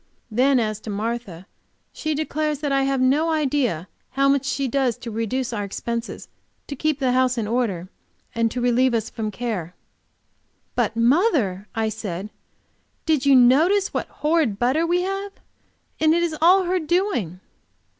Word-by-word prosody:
Then 255 +4 +3
as 215 -2 -2
to 215 - -9
Martha, 210 -4 -4 0.5
she 310 -1 -2
declares 305 0 -1
that 290 -2 -1
I 275 0 +2
have 270 -1 0
no 280 +6 +2
idea 270 - 0 0.2
how 275 +1 +1
much 275 -1 +2
she 275 0 -1
does 255 -2 0
to 240 -1 -7
reduce 235 +3 -2
our 205 -2 -2
expenses, 230 +4 -5 0.4
to 285 - -6
keep 310 +1 0
the 265 -3 +1
house 255 0 +2
in 225 - -1
order 215 -7 -1 0.5
and 230 -1 +1
to 250 - -4
relieve 245 +1 +2
us 225 -1 -2
from 220 -2 -3
care. 205 -6 -4 1.0
"But, - - 0
mother," 230 - +2
I 220 -1 0
said, 205 -2 -5 0.7
"did 300 -4 +1
you 275 - +7
notice 315 +11 +4
what - - -2
horrid 300 -9 0
butter 265 +9 +1
we 355 +1 +1
have? 390 +1 -4 0.7
And 315 +1 +4
it 345 - +1
is 330 -2 -1
all 370 +3 +6
her 365 +1 0
doing." 315 - -1
255 Hz, 165 wpm, -22 LUFS, 225-310 Hz, 1.0 s, you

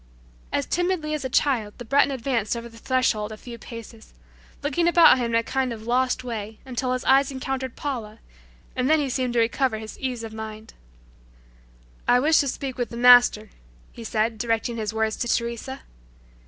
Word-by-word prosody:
As 140 - 0
timidly 350 -3 -1
as 300 -3 -3
a 260 - -3
child 245 -7 +1
the 245 - -8
Breton 280 +4 +3
advanced 235 -4 -1
over 235 0 -6
the 230 -1 -14
threshold 235 -5 0
a 215 - -8
few 235 +1 -10
paces, 230 -1 -11 0.5
looking 320 +4 +1
about 340 -6 +7
him 245 - 0
in 230 0 -1
a 230 - +3
kind 265 +1 -1
of 220 -1 -7
"lost" 255 +1 +1
way 220 -3 -5
until 255 0 -2
his 255 - -3
eyes 270 +1 +4
encountered 265 -1 -4
Paula, 230 -7 -5 0.6
and 255 +1 0
then 315 - +5
he 285 -3 -1
seemed 255 -1 -1
to 240 - +2
recover 230 +1 +1
his 220 0 -9
ease 250 -3 -3
of 225 -1 -7
mind. 220 0 -8 1.3
"I 245 - +5
wish 310 +4 +4
to 280 - +1
speak 265 0 -4
with 245 - -1
the 235 - -8
Master," 245 -3 +6 0.4
he 230 - -10
said 220 0 -1
directing 230 0 -1
his 215 -2 -2
words 220 0 0
to 240 - -2
Teresa. 235 +3 -2
245 Hz, 190 wpm, -24 LUFS, 225-265 Hz, 1.3 s, about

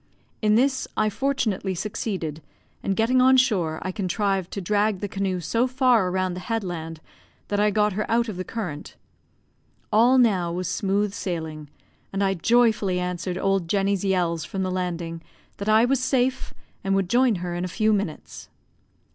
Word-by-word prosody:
In 215 -1 +3
this 265 +3 +2
I 215 0 +2
fortunately 215 -7 -1
succeeded, 180 -5 -4 0.4
and 195 - -1
getting 245 +4 +3
on 260 +1 +6
shore, 190 -12 +2
I 185 - -2
contrived 195 -1 -1
to - - -3
drag 205 +1 +1
the 205 - -3
canoe 195 -2 -2
so 230 +9 0
far 250 -7 +3
round 185 -1 -1
the - - -5
headland 175 -7 -3 0.5
that 205 - 0
I 210 0 +4
got 210 0 +1
her 210 +2 -3
out 235 +1 +2
of 215 - -5
the 185 - -4
current. 180 -9 -6 1.0
All 240 +5 +5
now 195 -9 +3
was 180 +1 -3
smooth 200 0 0
sailing, 160 -6 -5 0.4
and 195 +1 -1
I 195 0 +2
joyfully 215 -1 +2
answered 180 0 -3
old 195 -3 0
Jenny's 195 +1 +1
yells 175 -4 0
from 190 -1 -3
the 185 - -2
landing, 170 -2 -3 0.4
that 200 +1 -3
I 220 +2 +5
was 265 +1 +1
safe, 255 0 0 0.3
and 195 0 +1
would 195 -2 +1
join 245 +2 +3
her 175 -1 -4
in 175 +1 -3
a - - -1
few 215 +4 +1
minutes. 195 -6 -4
195 Hz, 170 wpm, -24 LUFS, 180-220 Hz, 1.0 s, on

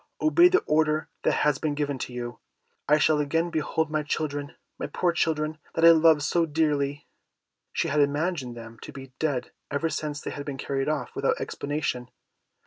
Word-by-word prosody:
"Obey 345 +2 +6
the 370 +1 +3
order 155 0 +1
that - - +2
has 145 -2 +2
been 150 -2 -1
given 145 -2 -2
to 125 - -5
you. 120 0 -6 0.5
I 150 - +6
shall 155 0 +3
again 165 +4 0
behold 160 0 -1
my 155 -1 +1
children, 145 -1 -3 0.2
my - - -3
poor 175 - +1
children, 155 -2 -1 0.2
that 165 - +4
I 170 - +11
loved 160 -2 +5
so 165 +2 +1
dearly." 145 -2 0 0.6
She - - -1
had 150 - +1
imagined 145 -3 0
them 115 0 -10
to - - -8
be 135 -1 -11
dead 145 -6 -1 0.2
ever 155 +3 -1
since 150 -1 -3
they - - -5
had 145 - -5
been 140 -2 -5
carried 135 +1 -2
off 155 -2 -2
without - - +1
explanation. 140 -4 -3
150 Hz, 185 wpm, -26 LUFS, 140-160 Hz, 0.6 s, I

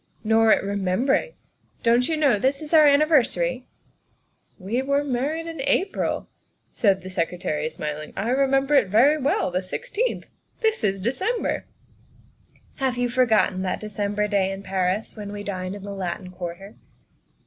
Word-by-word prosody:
" - - -36
Nor 225 0 +5
at - - +4
remembering. 200 - 0 0.5
Don't 240 +3 +3
you 320 - 0
know 280 -9 +3
this 270 +5 +1
is 305 - -7
our 310 -2 +7
anniversary? 265 - +2 0.3
' - - -43
' - - -45
" - - -43
We 240 +5 0
were 280 +2 +1
married 290 +5 -2
in 325 -4 -6
April," 320 +8 0 0.4
said 195 -4 +1
the 185 - -7
Secretary, 165 -3 -2
smiling. 150 -1 -6
" - - -24
I 220 - -1
remember 270 +2 +2
it 275 - +5
very 260 +10 +4
well. 275 -8 0
The 180 +1 0
sixteenth. 475 - -3 0.4
This 445 - +1
is 195 -2 +1
December! 375 - -1 0.3
' - - -31
' - - -37
" - - -32
Have 255 -2 +1
you 245 0 0
forgotten 225 -6 +2
that 185 -1 -2
December 210 0 -2
day 195 -2 +1
in 195 0 -7
Paris 190 +2 -1
when 205 -2 -7
we 205 0 -6
dined 185 -1 -4
in 200 - -9
the 200 0 -6
Latin 185 -1 -5
Quarter?" 180 +3 -8
215 Hz, 180 wpm, -24 LUFS, 190-275 Hz, 0.5 s, our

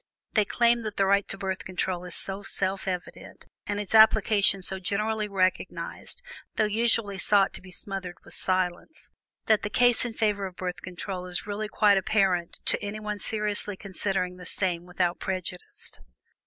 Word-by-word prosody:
They 215 -2 +3
claim 235 +2 +3
that 215 -2 -6
the 195 - +3
right 200 +1 +3
to 195 - -3
Birth 190 -1 -3
Control 185 -1 -2
is 180 - -3
so 195 +1 -1
self 195 -1 -1
evident, 180 -2 -6 0.2
and 205 0 -2
its 205 0 -3
application 215 -3 +5
so 190 +1 -1
generally 210 +3 -1
recognized 195 - -2 0.3
(though - - +2
usually 215 -2 +2
sought 200 -1 +5
to - - -4
be 185 - -13
smothered 185 0 -4
with - - -13
silence) 185 - -2 0.3
that 220 -1 +4
the 205 - -3
case 245 +1 +5
in 240 -2 -3
favor 205 -3 0
of 185 - -12
Birth 180 -1 -4
Control 180 0 -6
is 180 +2 -2
really 210 +1 -3
quite 210 -2 +4
apparent 190 -4 0
to - - +2
anyone 210 0 -4
seriously 210 -2 -1
considering 190 -2 -2
the 180 - -9
same 175 -3 0
without 180 -1 -1
prejudice. 185 -1 -4
195 Hz, 170 wpm, -27 LUFS, 185-210 Hz, 0.3 s, application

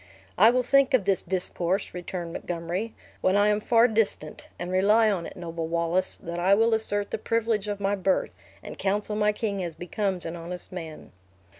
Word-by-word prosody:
"I 215 +5 +7
will 250 +1 +2
think 275 +1 +4
of 215 -7 +1
this 195 -1 +2
discourse," 185 +1 -2
returned 175 -1 -5
Montgomery, 175 +7 -4 0.3
"when 185 - +2
I 205 +1 +4
am 210 0 +2
far 230 +2 +4
distant; 215 -9 -1
and 175 +1 -5
rely 210 +4 +4
on 180 -4 -2
it, - - -11
noble 165 -2 -4
Wallace 170 +2 0
that 170 +1 -4
I 190 +3 +4
will 225 +2 +3
assert 205 -2 -1
the - - -2
privilege 225 -2 0
of 205 -1 -3
my 200 0 +1
birth, 190 -1 0 0.3
and - - -9
counsel 205 +2 -1
my 210 0 +3
king 205 -3 -3
as 170 -2 -5
becomes 185 +1 -3
an 165 +1 -4
honest 175 +1 -7
man." 165 -4 -8
195 Hz, 190 wpm, -26 LUFS, 175-215 Hz, 0.3 s, I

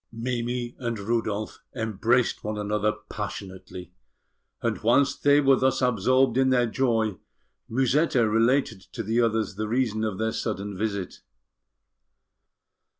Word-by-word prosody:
Mimi 120 +1 -3
and 115 -2 -3
Rudolf 110 0 -2 0.2
embraced 115 +2 0
one 105 0 -3
another 105 0 0 0.2
passionately; 95 -3 -7 0.7
and - - -2
whilst 120 +5 +2
they 145 0 +5
were 135 -2 +4
thus 130 0 +1
absorbed 125 +2 +2
in 130 0 +4
their 125 -2 +3
joy, 115 -5 0 0.5
Musetta 130 0 +2
related 115 -1 +2
to 115 - -4
the 115 +3 +1
others 115 -1 0
the 110 - -2
reason 110 -2 0
of 105 -4 -2
their 110 +1 -1
sudden 105 -2 -3
visit. 100 -2 -3
115 Hz, 125 wpm, -26 LUFS, 105-125 Hz, 0.7 s, they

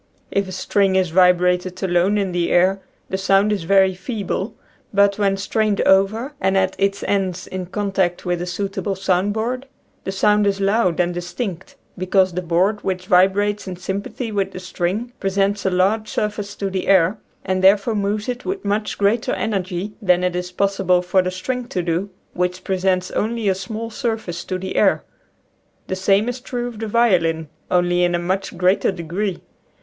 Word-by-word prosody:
If 200 -1 0
a - - -7
string 195 +1 +1
is 185 -3 +2
vibrated 180 +1 +3
alone 185 +3 +2
in 195 -2 0
the 175 -1 0
air 190 +2 +3 0.3
the 190 - -2
sound 195 +2 +3
is 195 -5 -3
very 190 +1 +4
feeble, 205 +2 -4 0.4
but 200 0 +3
when 195 -1 +2
strained 210 +1 0
over 215 +8 +2
and, 190 +1 +2
at 190 0 +1
its 195 0 0
ends, 190 -2 -1
in 185 -1 -5
contact 190 -3 -1
with 175 -1 -1
a 175 - -4
suit 195 +3 -3
able 200 -3 -2
sound 190 +1 +1
board, 250 +5 -3 0.4
the - - -3
sound 210 +1 +3
is 200 0 0
loud 195 -3 +1
and 175 0 +1
dis 175 0 -5
tinct, 190 -7 -5 0.2
because 185 0 +2
the 180 - -2
board 185 +5 +1
which 185 -1 -2
vibrates 200 +3 +2
in 185 - -4
sympathy 200 +6 -4
with 195 -2 -1
the - - -6
string 185 +6 -3
presents 195 +1 0
a - - +4
large 195 +4 +1
sur 210 - 0
face 205 -1 -7
to 195 -1 -3
the 190 -1 -3
air, 190 +2 +4 0.3
and 185 -1 -1
therefore 200 +4 +5
moves 205 0 -1
it 250 0 -3
with 385 - -4
much 210 +1 -1
greater 205 +3 +1
energy 195 -2 -2
than 180 -3 +3
it 180 -1 0
is 180 0 -3
possible 190 -1 +1
for 185 +1 +3
the 185 - -2
string 240 +7 -4
to 180 - -2
do, 175 +4 -1 0.2
which 180 +1 -2
presents 185 -1 0
only 225 0 -1
a 195 - +4
small 215 +4 -5
surface 220 -8 -3
to 185 - -3
the 190 +1 -5
air. - - +3 0.8
The 185 - -3
same 195 +3 +2
is 245 +1 -3
true 245 -1 -4
of 235 -3 -8
the 220 - -3
violin, 170 -9 +2 0.2
only 175 0 +2
in 175 0 +2
a - - +2
much 185 +1 -2
greater 185 +3 +3
degree. 180 +2 -3
195 Hz, 190 wpm, -21 LUFS, 180-205 Hz, 0.8 s, therefore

